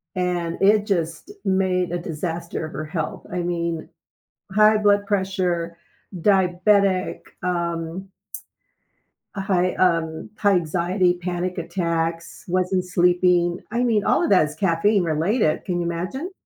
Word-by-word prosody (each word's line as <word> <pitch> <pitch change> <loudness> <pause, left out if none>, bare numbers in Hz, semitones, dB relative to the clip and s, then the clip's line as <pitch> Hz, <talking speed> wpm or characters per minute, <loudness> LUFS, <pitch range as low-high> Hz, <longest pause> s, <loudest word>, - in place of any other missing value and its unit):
And 175 -2 -2
it 210 +1 +4
just 170 - -2
made 185 -2 +1
a 175 - -1
disaster 170 0 -4
of 155 - -9
her 155 - -4
health, 160 -1 -4
I 180 - -2
mean, 170 -2 -3 0.6
high 215 +2 +5
blood 205 -1 +3
pressure, 185 -4 -1 0.4
diabetic, 190 +1 +2 0.2
um 170 +1 -3 1.2
uh, - - -4
high, 185 -2 +1
um 165 -1 0
high 205 -2 +3
anxiety, 175 +2 +1
panic 180 0 -3
attacks, 170 -1 -3
wasn't 185 +1 +1
sleeping, 180 -1 +2
I 235 +2 0
mean, 225 -4 +2
all - - +2
of - - 0
that 185 -6 +5
is 150 - -10
caffeine 195 +2 +2
related, 165 +2 +1
can 175 -2 -2
you 175 - -1
imagine? 185 - -4
180 Hz, 130 wpm, -22 LUFS, 170-195 Hz, 1.2 s, high